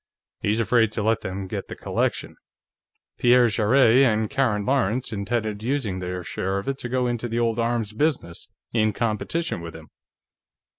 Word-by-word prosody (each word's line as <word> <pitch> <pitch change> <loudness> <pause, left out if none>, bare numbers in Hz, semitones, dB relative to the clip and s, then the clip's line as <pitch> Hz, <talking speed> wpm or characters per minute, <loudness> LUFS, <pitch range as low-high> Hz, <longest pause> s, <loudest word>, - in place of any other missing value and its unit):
He's 105 +2 0
afraid 115 0 +3
to 110 - -2
let 110 +1 +1
them 95 +1 -5
get 95 - -5
the - - -7
collection; - - -2 0.8
Pierre 125 0 +5
Jarrett 115 +3 +4
and 110 -4 +3
Karen 120 -7 +1
Lawrence 125 -2 0
intended 105 +1 -2
using 115 -6 -1
their 90 0 -4
share 95 +3 -2
of 100 - -5
it 135 0 -2
to 125 - -5
go 125 0 0
into 120 -1 -2
the 115 0 -3
old 115 -1 +1
arms 115 -2 -1
business, 115 - -2 0.2
in 110 -2 +2
competition 115 - -2
with 85 -1 -8
him." - - -12
115 Hz, 165 wpm, -24 LUFS, 105-125 Hz, 0.8 s, Pierre